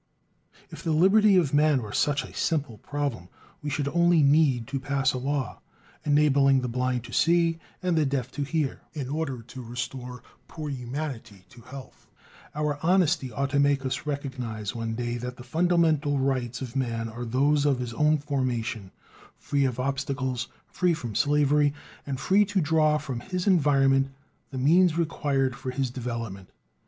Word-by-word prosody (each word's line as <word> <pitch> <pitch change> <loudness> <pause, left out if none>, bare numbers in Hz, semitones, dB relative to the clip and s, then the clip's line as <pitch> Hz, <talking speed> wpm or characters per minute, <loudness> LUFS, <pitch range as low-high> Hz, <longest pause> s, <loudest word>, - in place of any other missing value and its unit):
If - - -9
the 165 -3 0
liberty 195 +5 +5
of 160 -7 +2
man 145 -3 +3
were 105 - -7
such 145 0 +1
a - - -11
simple 145 - -1
problem, 140 -11 -4 0.3
we 150 - -3
should 145 0 -1
only 170 -1 +4
need 140 -4 +3
to 135 0 -2
pass 135 -1 0
a 130 - -3
law, 135 -2 -3 0.4
enabling 140 -2 +4
the 125 - -2
blind 125 0 -1
to - - -11
see 165 0 +3 0.2
and 180 -2 +1
the 160 - +3
deaf 135 -3 -2
to 145 - -5
hear, 145 -1 -1
in 140 -5 -5
order 140 -5 -3
to 125 +3 -10
restore 125 +1 -6 0.2
"poor 155 -2 -6
humanity" 125 -6 -6
to 120 - -15
health. 130 +3 -12 0.5
Our 150 -1 -1
honesty 170 -6 +2
ought 140 +4 -2
to 140 - +2
make 140 -1 +2
us 130 +3 -3
recognize 125 -7 -4
one 115 -1 -3
day 120 0 -2
that 125 +1 -6
the 125 - -10
fundamental 160 0 +2
rights 130 -2 -1
of 125 0 -8
man 115 -4 -1
are 115 +2 -7
those 140 +5 +2
of 140 -3 +2
his 125 -2 -4
own 150 +5 +3
"formation," 125 -8 -2 0.5
free 140 -1 0
from 125 0 -3
obstacles, 135 -3 -2 0.2
free 180 -2 0
from 120 -8 -6
slavery, 145 +2 +2 0.3
and 135 -2 -3
free 200 +7 +4
to 205 0 0
draw 155 -1 +3
from 130 -5 -5
his 180 +8 -4
environment 135 -7 +3 0.4
the 135 - -7
means 165 +5 +4
required 140 -6 0
for 130 - -6
his 130 -1 -2
development. 115 -6 -5
140 Hz, 170 wpm, -26 LUFS, 125-150 Hz, 0.5 s, liberty